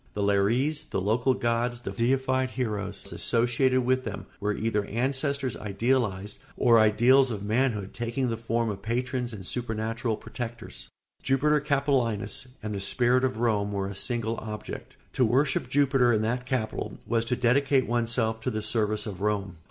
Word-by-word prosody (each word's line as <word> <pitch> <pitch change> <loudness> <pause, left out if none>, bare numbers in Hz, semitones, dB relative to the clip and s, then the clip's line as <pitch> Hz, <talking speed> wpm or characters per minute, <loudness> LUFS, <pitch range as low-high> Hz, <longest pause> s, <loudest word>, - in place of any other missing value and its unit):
The 105 - -1
lares, 115 +10 +1
the - - -2
local 120 +7 +2
gods, 120 0 0
the - - -5
deified 130 +2 +1
heroes 110 -6 -4
associated 125 +2 +2
with 130 +1 +2
them, 105 -5 -5
were 105 0 -1
either 105 -1 0
ancestors 130 +3 -1
idealised 105 -2 -1 0.2
or 115 -1 +5
ideals 120 +5 +5
of 105 -4 -4
manhood 110 -2 0
taking 120 +2 -2
the 115 - -1
form 115 0 -1
of 100 -1 -7
patrons 125 +2 -2
and 100 -5 -8
supernatural 115 0 -2
protectors. 120 0 -7 0.3
Jupiter 150 +3 +2
Capitolinus 135 -4 0 0.2
and 105 -1 -3
the 100 - -3
Spirit 125 +5 +2
of 130 -3 0
Rome 105 -3 +1
were 100 -1 -1
a 100 - -5
single 115 +2 -1
object. 105 -1 -7 0.2
To 130 - +2
worship 125 +2 +1
Jupiter 135 -3 +3
in 110 -2 +2
that 125 +3 -2
Capitol 120 -5 -2
was 115 +1 +1
to 125 +1 0
dedicate 130 +2 +3
oneself 115 -1 0
to 110 - -2
the 110 -3 -3
service 110 -1 0
of 100 -3 -6
Rome. 100 -4 -1
115 Hz, 160 wpm, -27 LUFS, 110-130 Hz, 0.3 s, or